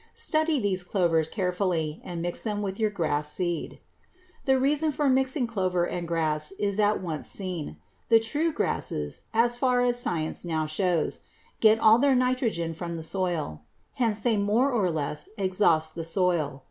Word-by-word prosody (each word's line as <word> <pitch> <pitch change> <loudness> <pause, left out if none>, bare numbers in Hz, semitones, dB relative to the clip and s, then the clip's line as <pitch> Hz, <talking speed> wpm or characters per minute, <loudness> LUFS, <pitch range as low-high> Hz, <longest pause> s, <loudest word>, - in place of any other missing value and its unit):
Study 310 -2 +1
these 195 -4 -1
clovers 170 -4 +1
carefully 180 -5 -1
and 170 -2 -5
mix 175 0 -3
them 210 -2 -2
with 195 0 -4
your 215 -1 +2
grass 150 -6 -1
seed. 175 +1 -2 0.7
The 265 -1 +4
reason 295 +3 +2
for 290 0 0
mixing 265 0 +2
clover 185 -6 0
and 175 -1 -4
grass 155 -2 -1
is 200 0 -1
at 210 0 +3
once 160 -4 -4
seen. 180 -6 -4 0.3
The 225 - +7
true 295 +9 0
grasses, 75 - -3
so 230 +2 +3
far 245 +1 +1
as 245 0 +2
science 160 -7 -2
now 160 -3 -1
shows, 165 +1 0 0.4
get 220 0 +6
all 225 +1 +6
their 275 0 +4
nitrogen 250 -10 0
from 170 +1 -5
the 165 - -6
soil; 165 - -2 0.3
hence 225 -4 0
they 225 0 +1
more 215 +7 +2
or 210 -7 +1
less 150 -2 -3
exhaust 185 -5 +2
the 165 - -5
soil. 165 -5 0
190 Hz, 165 wpm, -27 LUFS, 165-235 Hz, 0.7 s, The